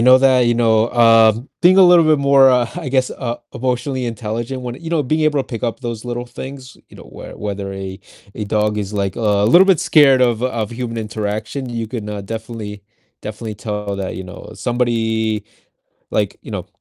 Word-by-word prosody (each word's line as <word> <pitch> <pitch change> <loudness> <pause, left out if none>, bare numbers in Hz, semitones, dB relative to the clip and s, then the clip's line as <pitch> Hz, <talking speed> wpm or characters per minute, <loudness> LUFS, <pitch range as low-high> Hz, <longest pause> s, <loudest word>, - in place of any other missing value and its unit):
know 130 +2 +7
that, 130 -2 +4
you 120 - +2
know, 115 -1 +2
um, 115 0 +4
being 185 +2 +5
a 195 - +8
little 175 -2 +6
bit 155 -1 +4
more, 140 -1 +5
uh, 125 -1 +3
I 160 -7 -4
guess, 130 -1 +1
uh, 120 -2 -4 0.2
emotionally 130 +1 -2
intelligent 115 +3 -4
when 125 -1 -5
you 165 - -6
know, 165 -3 +1
being 155 +4 -1
able 150 -2 +2
to - - -4
pick 115 -4 -7
up 120 +2 -2
those 120 -2 -6
little 120 0 -4
things, 130 +1 -9
you - - -16
know, - - -12
where - - -11
whether 100 -1 -5
a 95 0 -7 0.3
a 105 - -4
dog 105 +1 0
is, 100 0 -4
like, 100 -2 -1
uh, - - -4
a 105 -2 +2
little 175 - +6
bit 190 -5 +4
scared 135 -4 +5
of 120 -2 +1
of 115 -4 -2
human 115 -1 -5
interaction, 110 +4 -4
you 115 -2 -4
can, 110 -2 -6
uh, 105 -1 -5
definitely 110 -1 -7 0.4
definitely 110 +1 -6
tell 105 -1 -4
that, 95 -1 -4
you 95 - -6
know, 90 - -11
somebody 115 -3 -1 0.7
like, - - -1
you - - -11
know, - - -5
115 Hz, 205 wpm, -18 LUFS, 105-130 Hz, 0.7 s, a